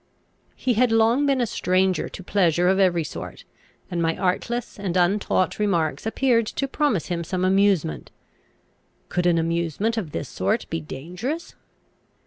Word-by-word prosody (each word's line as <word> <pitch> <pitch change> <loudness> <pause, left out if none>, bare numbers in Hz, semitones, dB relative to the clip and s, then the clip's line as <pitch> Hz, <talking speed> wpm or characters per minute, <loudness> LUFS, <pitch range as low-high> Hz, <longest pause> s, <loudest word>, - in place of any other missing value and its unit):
He 250 - 0
had 240 +1 +3
long 230 +5 +3
been 270 -2 +2
a - - +2
stranger 185 -3 +1
to 190 - -9
pleasure 175 -2 +2
of 190 +1 +3
every 175 -4 +3
sort, 150 - -8 0.5
and 175 -1 -1
my 165 0 0
artless 215 +6 -2
and 185 -3 -2
untaught 185 +1 +1
remarks 175 -3 0
appeared 230 -1 +2
to 275 - -2
promise 270 - 0
him 170 -1 -2
some 185 +2 -1
amusement. 190 - +2 1.0
Could 180 0 0
an 170 -1 +3
amusement 170 +7 -1
of 190 -8 -2
this 85 - -4
sort - - -1
be 80 - -2
dangerous? 180 - -5
190 Hz, 150 wpm, -24 LUFS, 170-225 Hz, 1.0 s, had